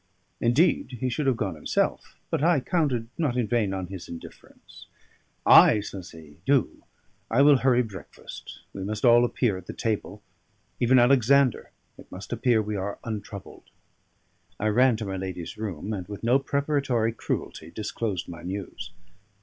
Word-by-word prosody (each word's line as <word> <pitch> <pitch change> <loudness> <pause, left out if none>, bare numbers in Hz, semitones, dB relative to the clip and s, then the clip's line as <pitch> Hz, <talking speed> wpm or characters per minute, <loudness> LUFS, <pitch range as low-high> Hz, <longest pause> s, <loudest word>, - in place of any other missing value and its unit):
Indeed, 125 0 +2
he 130 - -1
should 140 +3 -2
have 130 -3 +2
gone - - -2
himself, - - -2
but - - 0
I 170 -2 +4
counted 130 -7 -1
not 140 -7 0
in 125 - +1
vain 110 -2 0
on 95 -1 -3
his 90 -1 -9
indifference. 85 - -12 0.6
"Ay," - - +8
says 95 -3 -8
he, 75 -3 -14
"do. 135 +3 +1 0.5
I 125 +5 +4
will 145 -1 +7
hurry 125 -1 +3
breakfast: 105 -4 -10
we 95 - -6
must 105 +3 -2
all 120 0 +7
appear 120 -4 0
at 90 - -16
the - - -6
table, 105 -2 -3 0.6
even 125 +2 +4
Alexander; 130 +1 +4 0.3
it - - -15
must 95 +1 -7
appear 120 -4 +2
we 105 0 -4
are 100 +1 -3
untroubled." 105 -3 -8 0.9
I 110 +3 +1
ran 125 +2 +4
to 110 - -5
my 95 -1 -4
lady's 90 -3 -6
room, 105 -1 -5
and 95 -4 -5
with 105 +1 -8
no 125 +4 +4
preparatory 140 -5 0
cruelty 80 -7 -4
disclosed 105 -1 -4
my 85 -1 -9
news. 90 -1 -6
110 Hz, 160 wpm, -26 LUFS, 95-130 Hz, 0.9 s, Ay